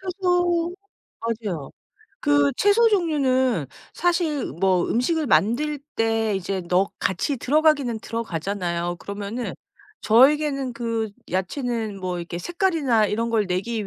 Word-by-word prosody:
채소 355 -2 0 0.5
맞아요. 215 -10 -4 0.5
그 145 -1 +3
채소 440 +3 +4
종류는 260 - +1 0.3
사실 340 -5 0
뭐 185 0 +1
음식을 300 +6 +1
만들 285 +9 +2 0.2
때 225 -2 +1
이제 190 0 -3
넣 180 +3 +1
같이 195 +9 -1
들어가기는 280 -4 +2
들어가잖아요. 175 -5 -3
그러면은 205 +5 -5 0.5
저에게는 275 +2 +3
그 230 -2 -2 0.2
야채는 220 +2 -2
뭐 180 -1 -3
이렇게 170 0 -5
색깔이나 310 - +1
이런 230 +3 -1
걸 215 -3 +1
내기 200 +4 -2
230 Hz, 265 characters per minute, -23 LUFS, 195-300 Hz, 0.5 s, 채소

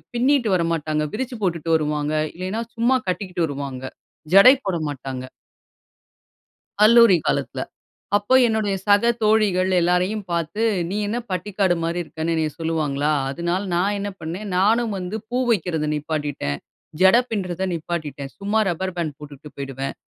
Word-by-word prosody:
பின்னிட்டு 250 -2 +2
வர 170 -2 +1
மாட்டாங்க. 155 -1 -1
விரிச்சி 250 +1 -4
போட்டுட்டு 170 -3 -1
வருவாங்க. 150 -1 -1 0.2
இல்லைனா, 185 +5 -3
சும்மா 240 +3 +3
கட்டிக்கிட்டு 180 -2 -1
வருவாங்க. 135 -2 -6 0.5
ஜடை 250 +7 +9
போட 190 -3 0
மாட்டாங்க. 130 -2 -6 1.6
கல்லூரி 230 -4 +7
காலத்துல. - - -1 0.6
அப்போ 205 +5 +1
என்னுடைய 220 -3 0
சக 205 +3 +4
தோழிகள் 210 -4 +3
எல்லாரையும் 180 +4 +1
பாத்து 170 +5 -2 0.3
"நீ 200 - -2
என்ன 225 +4 -2
பட்டிக்காடு 190 0 0
மாரி 170 +1 -1
இருக்கன்னு" 160 +1 -3
என்னய 160 -1 0
சொல்லுவாங்களா! 155 -3 0 0.2
அதுனால 170 +6 -2
நான் 200 +4 +1
என்ன 200 0 -3
பண்ணேன், 175 +6 -5
நானும் 220 +4 +2
வந்து 185 +3 -4
பூ 245 - 0
வைக்கிறத 165 -7 0
நிப்பாட்டிட்டேன், 145 - -3 0.4
ஜட 190 +4 +7
பின்றத 190 -4 -3
நிப்பாட்டிட்டேன். 155 -4 -5
சும்மா 205 +2 0
ரப்பர் 185 +2 -3
பேண்ட் 155 -4 -3
போட்டுட்டு 150 0 -11
போயிடுவேன். 135 -1 -5
180 Hz, 135 wpm, -22 LUFS, 155-205 Hz, 1.6 s, ஜடை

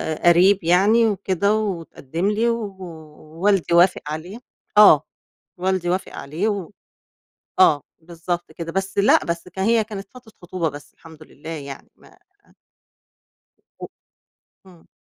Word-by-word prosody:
ق - - -8
قريّب 185 +3 +5
يعني، 200 +7 +4
وكده 200 0 0
واتقدّم 175 -5 -3
لي 220 +3 +1
و 220 -4 -3
ووالدي 165 +2 -3
وافق 175 +2 +4
عليه 165 +8 -6 0.4
آه. 205 -9 +8 0.5
والدي 185 -1 -1
وافق 185 +2 -2
عليه 160 +9 -3
و 200 -4 -4 0.9
آه، 150 -6 +5 0.2
بالضبط 170 +1 -5
كده. 165 +1 -7
بس 195 +2 -4
لأ، 200 +1 +4
بس 170 +1 -4
ك 180 +1 -11
هي 225 +3 +2
كانت 205 -2 -8
فترة 250 -3 -16
خطوبة 175 -2 -3
بس 145 0 -12
الحمد 160 -2 -15
لله 155 +1 -13
يعني 140 -4 -8
ما - - -21 1.6
و - - -6 0.8
إمم. 175 -3 -19
180 Hz, 130 wpm, -21 LUFS, 165-200 Hz, 1.6 s, آه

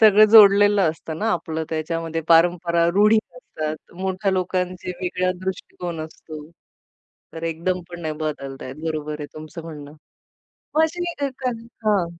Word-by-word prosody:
सगळं 215 -1 +8
जोडलेलं 205 -1 +7
असतं 160 0 -7
ना, 225 +1 0
आपलं 160 -1 -3
त्याच्यामध्ये 165 +1 -2
परंपरा, 170 0 +4
रूढी 210 +2 +5 0.2
असतात, 155 -10 -5 0.2
मोठ्या 190 +1 0
लोकांचे 180 -1 -2
वेगळा 185 0 0
दृष्टिकोन 175 -3 -5
असतो. 155 -1 -10 0.9
तर 165 - -8
एकदम 180 +3 -2
पण 175 0 -8
नाही 155 -2 -3
बदलताहेत 135 -3 -5
बरोबर 150 -1 -3
आहे 145 - -4
तुमचं 155 +2 -8
म्हणणं. 150 -3 -9 0.8
पण 315 - +4
अशी 340 +2 0 0.2
अ, 280 - +1 0.2
कण 230 -2 -2 0.2
हां. 200 -5 +3
175 Hz, 140 wpm, -22 LUFS, 160-195 Hz, 0.9 s, सगळं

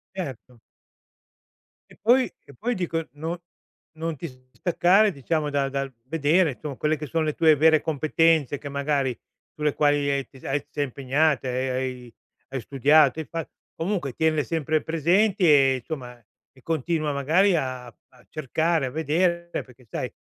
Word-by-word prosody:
Certo. 130 - -7 1.3
Che - - -18
poi 245 0 +4
che 140 - -16
poi 240 - -2
dico, 165 -4 -2
non 160 +3 -4 0.6
non 165 0 -3
ti 170 - -5 0.2
distaccare 180 - +3
diciamo 150 0 -2
da 140 -1 0
dal 135 0 -3
vedere 160 +4 +2
insom 140 +2 -7
quelle 155 +1 0
che 150 - -6
sono 165 +1 0
le 155 -1 -1
tue 160 -1 +5
vere 155 +1 +5
competenze 155 -1 +2
che 145 - -8
magari 140 -3 -1 0.4
sulle 150 -1 0
quali 145 -1 +2
hai 140 -1 -1
t 130 - -17
hai 135 +2 0
ti - - -43
sei 145 - -2
impegnata 140 +1 0
e 130 +1 -1
hai 130 0 -1
hai 120 -2 -15 0.4
hai 135 - -4
studiato, 140 +4 +4
hai - - -8
fat 165 0 -5 0.2
comunque 170 -5 -2
tienle 155 +2 +1
sempre 155 -1 -1
presenti 180 +5 +2
e 140 -4 +5
insomma 125 -1 -6 0.4
e 130 - -22
continua 155 0 -1
magari 165 +8 +3
a 130 -5 -2
a 120 - -20
cercare, 155 +1 0
a - - -3
vedere, 170 +4 0 0.2
perché 125 -1 -19
sai, - - -4
150 Hz, 165 wpm, -25 LUFS, 135-165 Hz, 1.3 s, tue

